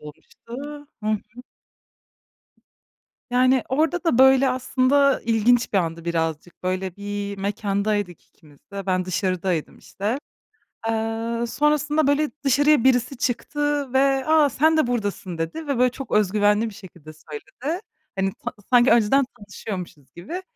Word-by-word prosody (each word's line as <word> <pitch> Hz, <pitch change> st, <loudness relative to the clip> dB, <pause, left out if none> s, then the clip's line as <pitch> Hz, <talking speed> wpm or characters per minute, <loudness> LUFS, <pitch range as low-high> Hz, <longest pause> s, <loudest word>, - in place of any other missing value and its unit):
olmuştu. 150 Hz, 0 st, -15 dB, 0.6 s
Hı 215 Hz, -, -5 dB
hı. 215 Hz, +3 st, -5 dB, 1.9 s
Yani, 255 Hz, +1 st, +3 dB
orada 320 Hz, +6 st, 0 dB
da, 255 Hz, -7 st, +2 dB
böyle, 265 Hz, 0 st, +6 dB
aslında 260 Hz, +2 st, +2 dB
ilginç 235 Hz, +2 st, +2 dB
bir 200 Hz, -, +3 dB
andı 165 Hz, -1 st, -3 dB
birazcık. 165 Hz, 0 st, -3 dB
Böyle, 185 Hz, 0 st, -2 dB
bir 200 Hz, 0 st, -5 dB
mekândaydık 200 Hz, -2 st, -2 dB
ikimiz 145 Hz, -3 st, -22 dB
de. 195 Hz, -1 st, -6 dB
Ben 185 Hz, -1 st, +1 dB
dışarıdaydım 185 Hz, -2 st, -2 dB
işte. 195 Hz, -, -12 dB, 0.8 s
Eee, 225 Hz, +1 st, -2 dB
sonrasında, 300 Hz, +2 st, +1 dB
böyle, 290 Hz, +1 st, +2 dB
dışarıya 285 Hz, 0 st, +4 dB
birisi 250 Hz, +1 st, +2 dB
çıktı 285 Hz, +2 st, -1 dB
ve 270 Hz, 0 st, +2 dB
"A, 310 Hz, -2 st, +5 dB
sen 315 Hz, +4 st, +3 dB
de 310 Hz, -, +3 dB
buradasın." 205 Hz, -7 st, -3 dB
dedi 165 Hz, -, -4 dB
ve, 280 Hz, -4 st, -1 dB
böyle, 250 Hz, 0 st, +4 dB
çok 270 Hz, +2 st, -9 dB
öz 210 Hz, -2 st, +2 dB
güvenli 210 Hz, +2 st, +2 dB
bir 205 Hz, -, -10 dB
şekilde 175 Hz, -7 st, -13 dB
söyledi. 350 Hz, -, -6 dB, 0.4 s
Hani, 195 Hz, 0 st, 0 dB
ta -, -, -3 dB, 0.2 s
sanki 245 Hz, 0 st, +5 dB
önceden 235 Hz, +4 st, +4 dB
tanışıyormuşuz 190 Hz, -8 st, -8 dB
gibi. 275 Hz, -, -6 dB
230 Hz, 135 wpm, -23 LUFS, 195-275 Hz, 1.9 s, böyle